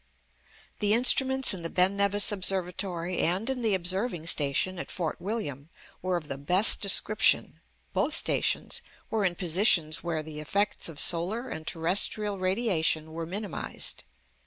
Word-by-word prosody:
The 210 Hz, 0 st, +2 dB
instruments 265 Hz, +1 st, +3 dB
in 185 Hz, -, -6 dB
the 165 Hz, -, -5 dB
Ben 185 Hz, +3 st, +2 dB
Nevis 200 Hz, +1 st, +3 dB
Observatory, 185 Hz, -2 st, -1 dB
and 185 Hz, +7 st, 0 dB
in 255 Hz, -2 st, -5 dB
the 220 Hz, -4 st, +1 dB
Observing 185 Hz, 0 st, -2 dB
Station 165 Hz, +4 st, 0 dB
at -, -, -7 dB
Fort 170 Hz, -4 st, -4 dB
William, 165 Hz, -, -5 dB, 0.3 s
were 185 Hz, -1 st, -1 dB
of 155 Hz, -3 st, -9 dB
the 140 Hz, -, -6 dB
best 180 Hz, +9 st, +6 dB
description. 210 Hz, +2 st, +3 dB, 0.3 s
Both -, -, 0 dB
stations -, -, -1 dB, 0.3 s
were 220 Hz, -2 st, -1 dB
in 180 Hz, -2 st, 0 dB
positions 170 Hz, -3 st, +1 dB
where 165 Hz, -2 st, -3 dB
the 155 Hz, -1 st, -9 dB
effects 200 Hz, +5 st, -1 dB
of 150 Hz, -3 st, -11 dB
solar 190 Hz, +9 st, 0 dB
and 160 Hz, 0 st, -8 dB
terrestrial 195 Hz, +4 st, 0 dB
radiation 185 Hz, -5 st, -1 dB
were 165 Hz, 0 st, -6 dB
minimised. 200 Hz, +1 st, -5 dB
185 Hz, 145 wpm, -27 LUFS, 165-205 Hz, 0.3 s, best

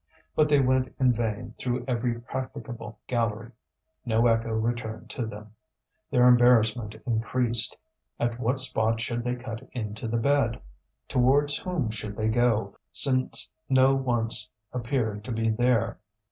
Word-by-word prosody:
But 155 Hz, -1 st, +3 dB
they 145 Hz, -1 st, +5 dB
went 130 Hz, -1 st, +1 dB
in 130 Hz, -2 st, +4 dB
vain 115 Hz, 0 st, -3 dB
through 125 Hz, -1 st, -2 dB
every 120 Hz, -1 st, -1 dB
practicable 120 Hz, -3 st, -6 dB
gallery; 115 Hz, -1 st, -1 dB, 0.5 s
no 115 Hz, 0 st, +2 dB
echo 115 Hz, -1 st, +2 dB
returned 110 Hz, 0 st, -3 dB
to 120 Hz, -3 st, -3 dB
them. 105 Hz, 0 st, -10 dB, 0.6 s
Their 125 Hz, 0 st, +5 dB
embarrassment 120 Hz, -3 st, +4 dB
increased. 115 Hz, 0 st, 0 dB, 0.4 s
At 120 Hz, 0 st, -1 dB
what 125 Hz, +2 st, 0 dB
spot 115 Hz, -3 st, +1 dB
should 120 Hz, +1 st, -2 dB
they 125 Hz, 0 st, -1 dB
cut 120 Hz, -2 st, -7 dB
into 110 Hz, -2 st, -4 dB
the 115 Hz, +1 st, 0 dB
bed? 125 Hz, -1 st, +2 dB, 0.5 s
Towards 140 Hz, +3 st, +3 dB
whom 165 Hz, -12 st, -2 dB
should 105 Hz, -1 st, -6 dB
they 110 Hz, 0 st, +1 dB
go, 110 Hz, -3 st, +1 dB, 0.2 s
since 130 Hz, -2 st, +3 dB, 0.2 s
no 130 Hz, 0 st, +5 dB
once 115 Hz, -5 st, 0 dB, 0.2 s
appeared 115 Hz, -4 st, -2 dB
to 130 Hz, -, -5 dB
be 115 Hz, 0 st, 0 dB
there? 120 Hz, 0 st, +1 dB
120 Hz, 140 wpm, -27 LUFS, 110-125 Hz, 0.6 s, they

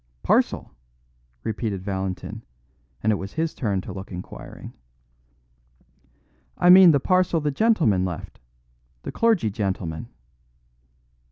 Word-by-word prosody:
"Parcel?" -, -, +1 dB, 0.7 s
repeated 105 Hz, -3 st, -3 dB
Valentin; 95 Hz, -2 st, -4 dB, 0.6 s
and 110 Hz, -, +3 dB
it 105 Hz, -, +1 dB
was 95 Hz, +1 st, -7 dB
his 160 Hz, 0 st, -1 dB
turn 100 Hz, -6 st, -1 dB
to 95 Hz, -, -8 dB
look 95 Hz, +1 st, -8 dB
inquiring. 90 Hz, -9 st, -9 dB, 1.8 s
"I 175 Hz, -, +6 dB
mean 185 Hz, -1 st, +9 dB
the 145 Hz, -3 st, +4 dB
parcel 185 Hz, +1 st, +2 dB
the 150 Hz, -1 st, -1 dB
gentleman 140 Hz, -, +2 dB
left 90 Hz, -3 st, -6 dB, 0.6 s
the -, -, -5 dB
clergyman 215 Hz, -, +2 dB
gentleman." 95 Hz, -6 st, -3 dB
105 Hz, 110 wpm, -24 LUFS, -, 1.8 s, mean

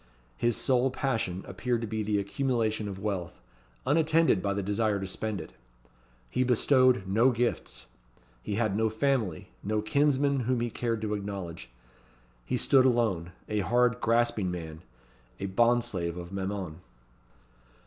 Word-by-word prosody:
His 120 Hz, -, +1 dB
sole 130 Hz, 0 st, +2 dB
passion 115 Hz, -9 st, -2 dB
appeared 115 Hz, +4 st, -1 dB
to -, -, -2 dB
be 110 Hz, 0 st, -2 dB
the 105 Hz, 0 st, 0 dB
accumulation 110 Hz, 0 st, -1 dB
of 100 Hz, -2 st, -5 dB
wealth; 95 Hz, -4 st, -4 dB, 0.5 s
unattended 160 Hz, -, +3 dB
by 100 Hz, 0 st, -1 dB
the 100 Hz, -, -2 dB
desire 105 Hz, +1 st, 0 dB
to 95 Hz, -, -4 dB
spend 105 Hz, +1 st, -3 dB
it. 80 Hz, -, -9 dB, 0.7 s
He 130 Hz, -, 0 dB
bestowed 130 Hz, -2 st, +4 dB
no 110 Hz, +7 st, +4 dB
gifts. 120 Hz, -1 st, -2 dB, 0.6 s
He 100 Hz, -, -3 dB
had 110 Hz, -3 st, 0 dB
no 110 Hz, +1 st, +2 dB
family, 110 Hz, -, -1 dB
no 110 Hz, +2 st, -1 dB
kinsmen, 140 Hz, +4 st, +2 dB
whom 125 Hz, 0 st, 0 dB
he 120 Hz, 0 st, -2 dB
cared 115 Hz, -2 st, -2 dB
to 105 Hz, -1 st, -1 dB
acknowledge. 100 Hz, -7 st, -5 dB, 0.8 s
He -, -, 0 dB
stood 130 Hz, -2 st, +5 dB
alone 110 Hz, -9 st, +1 dB, 0.2 s
a 105 Hz, -, -1 dB
hard, 120 Hz, +3 st, +2 dB
grasping 115 Hz, -4 st, +2 dB
man: 80 Hz, -3 st, -6 dB, 0.6 s
a -, -, -3 dB
bond 120 Hz, +5 st, +3 dB
slave 90 Hz, -7 st, -2 dB
of 85 Hz, 0 st, -7 dB
Mammon. 95 Hz, -4 st, -4 dB
110 Hz, 150 wpm, -29 LUFS, 95-125 Hz, 0.8 s, stood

